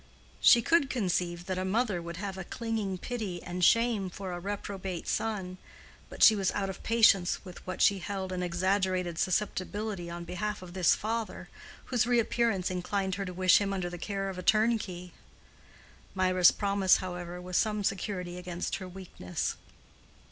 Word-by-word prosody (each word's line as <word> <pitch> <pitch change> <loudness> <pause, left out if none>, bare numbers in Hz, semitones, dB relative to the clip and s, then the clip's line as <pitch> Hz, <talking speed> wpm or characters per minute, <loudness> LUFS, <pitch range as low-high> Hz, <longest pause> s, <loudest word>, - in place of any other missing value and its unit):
She 235 -2 +7
could 305 0 +3
conceive 180 -7 -1
that 185 0 -2
a - - -1
mother 200 -1 0
would 170 0 -7
have 195 0 -4
a 190 - -5
clinging 220 -2 -3
pity 210 -5 -4
and 180 +1 -4
shame 230 -1 +3
for 190 +1 -6
a 175 - -4
reprobate 195 -2 -5
son, 190 -5 -2 0.5
but - - -1
she 220 - +9
was 195 -2 +1
out 195 -1 -1
of 190 - -11
patience 215 -6 +3
with 180 -2 -10
what 185 - -1
she 200 -1 +4
held 190 0 -4
an 180 -1 -2
exaggerated 180 -1 0
susceptibility 200 -1 -2
on 170 0 -6
behalf 205 +3 -4
of 175 -1 -10
this 185 -3 +4
father, 225 +1 -4 0.4
whose 245 -2 +1
reappearance 230 -5 +1
inclined 190 +1 -2
her 195 +1 -3
to 180 - -5
wish 185 +2 +5
him 200 -1 -1
under 180 -2 -3
the 175 - -7
care 195 +1 -3
of 190 -1 -5
a - - -3
turnkey. 205 -4 +1 1.0
Mirah's 185 -1 +5
promise, 200 -2 +3
however, 180 -1 -6
was 180 0 -6
some 210 +1 +1
security 180 -2 -3
against 180 -1 -3
her 185 - -7
weakness. 180 - -4
190 Hz, 170 wpm, -30 LUFS, 180-210 Hz, 1.0 s, she